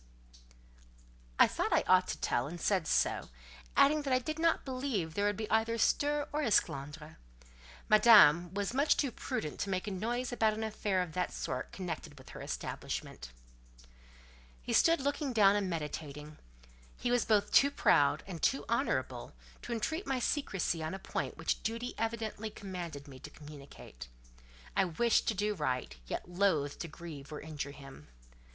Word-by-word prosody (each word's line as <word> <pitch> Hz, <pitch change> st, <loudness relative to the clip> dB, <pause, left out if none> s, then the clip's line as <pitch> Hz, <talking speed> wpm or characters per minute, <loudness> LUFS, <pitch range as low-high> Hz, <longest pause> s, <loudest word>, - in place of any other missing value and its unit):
I -, -, +8 dB
thought -, -, -2 dB
I -, -, +3 dB
ought -, -, +4 dB
to -, -, -3 dB
tell, 120 Hz, +3 st, 0 dB
and 170 Hz, +3 st, -7 dB
said 185 Hz, -5 st, +1 dB
so; -, -, +1 dB, 0.5 s
adding 300 Hz, +2 st, +5 dB
that 280 Hz, -2 st, -3 dB
I 255 Hz, -, +5 dB
did 310 Hz, +5 st, -4 dB
not 330 Hz, 0 st, +2 dB
believe 255 Hz, -, -2 dB
there 205 Hz, +3 st, 0 dB
would 205 Hz, -1 st, 0 dB
be 220 Hz, -, -3 dB
either 225 Hz, +1 st, +2 dB
stir 290 Hz, +5 st, +1 dB
or 300 Hz, -, 0 dB
esclandre: 150 Hz, -, -1 dB, 0.7 s
Madame 210 Hz, -7 st, +7 dB
was 200 Hz, +3 st, -2 dB
much 285 Hz, +3 st, +3 dB
too 275 Hz, -4 st, 0 dB
prudent 150 Hz, -8 st, -4 dB
to 200 Hz, -, -2 dB
make 185 Hz, -1 st, -1 dB
a 210 Hz, -, -4 dB
noise 240 Hz, +6 st, -2 dB
about 220 Hz, -3 st, +2 dB
an 220 Hz, -, -4 dB
affair 205 Hz, -3 st, 0 dB
of 175 Hz, -, -8 dB
that 180 Hz, -, -1 dB
sort 125 Hz, -, -4 dB
connected 165 Hz, -5 st, -6 dB
with 130 Hz, -, -14 dB
her -, -, -9 dB
establishment. -, -, -5 dB, 1.3 s
He -, -, -3 dB
stood 330 Hz, -2 st, +4 dB
looking 285 Hz, -1 st, -1 dB
down 205 Hz, -3 st, +5 dB
and 200 Hz, -2 st, 0 dB
meditating. 150 Hz, -2 st, -6 dB, 0.6 s
He 245 Hz, -, -1 dB
was 245 Hz, -1 st, +3 dB
both 210 Hz, -2 st, +2 dB
too 280 Hz, -, +6 dB
proud 145 Hz, -, +3 dB
and 180 Hz, -4 st, -7 dB
too 270 Hz, -, +1 dB
honourable -, -, -1 dB, 0.3 s
to -, -, -8 dB
entreat 315 Hz, -, -2 dB
my 270 Hz, -, 0 dB
secresy 195 Hz, -, -1 dB
on 155 Hz, +4 st, -3 dB
a -, -, -4 dB
point -, -, -4 dB
which -, -, -1 dB
duty 230 Hz, +2 st, -3 dB
evidently 225 Hz, -1 st, -3 dB
commanded 175 Hz, -8 st, -7 dB
me 130 Hz, -2 st, -11 dB
to 150 Hz, -, -9 dB
communicate. 145 Hz, -, -12 dB, 0.7 s
I 195 Hz, -, +4 dB
wished 225 Hz, +7 st, +1 dB
to 220 Hz, -, +1 dB
do 210 Hz, +2 st, 0 dB
right, 130 Hz, -, -2 dB
yet -, -, -4 dB
loathed 175 Hz, -6 st, 0 dB
to 170 Hz, -, -4 dB
grieve 155 Hz, -3 st, -10 dB
or 150 Hz, -, -5 dB
injure 150 Hz, -2 st, -5 dB
him. 140 Hz, -, -12 dB
195 Hz, 170 wpm, -32 LUFS, 155-235 Hz, 1.3 s, I